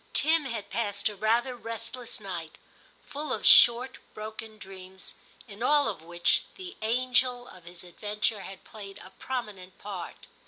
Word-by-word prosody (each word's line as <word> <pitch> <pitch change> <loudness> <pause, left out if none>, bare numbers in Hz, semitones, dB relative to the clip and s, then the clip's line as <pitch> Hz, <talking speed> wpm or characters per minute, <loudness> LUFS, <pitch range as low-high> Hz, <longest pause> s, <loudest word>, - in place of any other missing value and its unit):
Tim 315 -1 +4
had 230 -5 -5
passed 205 -1 0
a 210 - -8
rather 235 +5 +2
restless 230 +1 -5
night, 175 -6 -6 0.5
full 295 -1 -5
of - - -2
short 245 +2 +7 0.2
broken 220 0 -7
dreams, 190 -2 -10 0.3
in 205 0 -11
all 290 +3 +4
of - - -3
which, 175 +1 +2
the 375 0 -8
'anger 250 +2 +2
of 180 -7 -14
his 175 +1 -9
adventure 210 +3 -2
had 190 0 -9
played 200 -2 -10
a 185 - -13
prominent 205 -6 -5
part. 195 -4 -7
215 Hz, 150 wpm, -29 LUFS, 190-245 Hz, 0.5 s, short